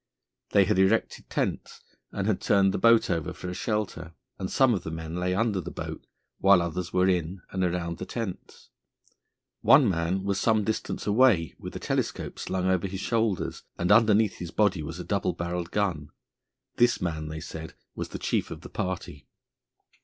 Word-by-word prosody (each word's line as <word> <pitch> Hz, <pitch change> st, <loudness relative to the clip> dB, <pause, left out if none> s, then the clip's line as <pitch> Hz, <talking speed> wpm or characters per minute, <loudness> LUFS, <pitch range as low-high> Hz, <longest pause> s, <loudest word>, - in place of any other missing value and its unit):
They 100 Hz, -1 st, +5 dB
had 100 Hz, 0 st, +1 dB
erected 95 Hz, +4 st, +1 dB
tents -, -, -2 dB, 0.3 s
and 100 Hz, -, -3 dB
had 105 Hz, -3 st, 0 dB
turned 95 Hz, -1 st, +3 dB
the -, -, -1 dB
boat 115 Hz, -3 st, +5 dB
over 85 Hz, 0 st, -2 dB
for 90 Hz, -, -7 dB
a -, -, -4 dB
shelter, 105 Hz, +1 st, -3 dB, 0.2 s
and 95 Hz, -, -3 dB
some 130 Hz, -3 st, +4 dB
of 95 Hz, -, -1 dB
the 80 Hz, -, -6 dB
men 80 Hz, 0 st, -6 dB
lay 90 Hz, +1 st, 0 dB
under 105 Hz, -2 st, +1 dB
the -, -, -6 dB
boat, -, -, -7 dB, 0.3 s
while 95 Hz, -1 st, +6 dB
others 85 Hz, +1 st, -3 dB
were 90 Hz, 0 st, +3 dB
in 90 Hz, 0 st, -1 dB
and 95 Hz, -1 st, -1 dB
around 85 Hz, -1 st, -2 dB
the 95 Hz, -, -4 dB
tents. 115 Hz, -6 st, -6 dB, 0.9 s
One 135 Hz, -, +6 dB
man 90 Hz, +1 st, 0 dB
was 100 Hz, -1 st, 0 dB
some 110 Hz, -2 st, +2 dB
distance 110 Hz, +1 st, -3 dB
away 105 Hz, -6 st, +4 dB
with -, -, -8 dB
a -, -, -4 dB
telescope -, -, -2 dB
slung 95 Hz, -1 st, -2 dB
over 95 Hz, 0 st, +1 dB
his 95 Hz, 0 st, -5 dB
shoulders, 110 Hz, -4 st, -1 dB, 0.2 s
and 90 Hz, +3 st, 0 dB
underneath 110 Hz, -1 st, +4 dB
his 85 Hz, -, -5 dB
body 100 Hz, -3 st, +2 dB
was 80 Hz, +4 st, -6 dB
a -, -, -4 dB
double 100 Hz, -2 st, 0 dB
barrelled 85 Hz, 0 st, -3 dB
gun. 90 Hz, -8 st, -1 dB, 0.7 s
This 120 Hz, 0 st, +4 dB
man, 80 Hz, -3 st, -3 dB
they 80 Hz, +1 st, -5 dB
said, 80 Hz, 0 st, -8 dB, 0.2 s
was -, -, -5 dB
the -, -, -5 dB
chief -, -, -1 dB
of -, -, -8 dB
the -, -, -10 dB
party. 90 Hz, -6 st, -5 dB
95 Hz, 185 wpm, -27 LUFS, 85-105 Hz, 0.9 s, while